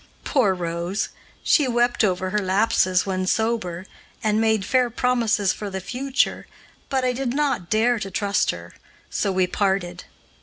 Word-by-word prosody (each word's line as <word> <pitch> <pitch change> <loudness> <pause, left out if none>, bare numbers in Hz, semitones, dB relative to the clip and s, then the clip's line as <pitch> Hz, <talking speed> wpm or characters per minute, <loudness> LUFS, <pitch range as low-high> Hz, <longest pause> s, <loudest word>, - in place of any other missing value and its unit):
Poor 215 -9 +2
Rose! 175 +3 -2 0.3
she 295 -4 +4
wept 240 0 +2
over 185 -2 0
her 210 - +1
lapses 185 -2 +2
when 185 -1 -2
sober, 195 -5 -1 0.4
and 215 0 +2
made 220 -3 +2
fair 250 +3 +2
promises 230 -5 +1
for 210 - -6
the 190 0 -4
future, 260 +7 -1 0.4
but 265 -1 0
I 250 - +1
did 255 0 -2
not 280 -12 0
dare 230 +2 +2
to 195 - -4
trust 200 +1 0
her, - - -5 0.4
so 200 - 0
we 185 -1 +2
parted. 180 -2 -1
210 Hz, 155 wpm, -23 LUFS, 185-240 Hz, 0.4 s, she